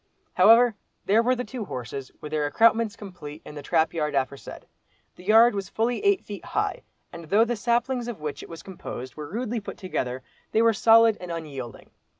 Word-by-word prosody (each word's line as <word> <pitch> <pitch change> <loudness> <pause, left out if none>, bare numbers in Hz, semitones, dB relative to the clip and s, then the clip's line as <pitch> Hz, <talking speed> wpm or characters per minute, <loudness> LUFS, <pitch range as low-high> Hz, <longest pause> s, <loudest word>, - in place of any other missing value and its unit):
However 235 +1 +6 0.3
there 215 +3 +4
were 250 +2 +2
the 250 - -3
two 250 -2 -6
horses 130 -3 -6
with 150 - -7
their 150 -1 0
accoutrements 225 +6 +3
complete, 175 -8 -10
in - - -9
the 145 - -7
trap 160 +2 +1
yard 150 -3 -2
aforesaid. 135 0 -3 0.5
The 180 - -14
yard 225 +4 +6
was 200 -1 -4
fully 235 - -1
eight 400 -2 +2
feet 205 -1 -8
high, - - -2 0.3
and 170 -1 -9
though 205 +8 +4
the 240 +1 -1
saplings 240 +3 0
of 235 -7 -6
which 150 -1 -5
it - - -11
was 165 -1 -9
composed 130 -9 -8
were 150 -1 -8
rudely 235 +4 -3
put 205 - -8
together, 130 -9 -4 0.3
they 220 - +4
were 230 -1 +5
solid 225 0 +5
and 180 -1 -6
unyielding. 140 -8 -7
200 Hz, 195 wpm, -25 LUFS, 150-230 Hz, 0.5 s, However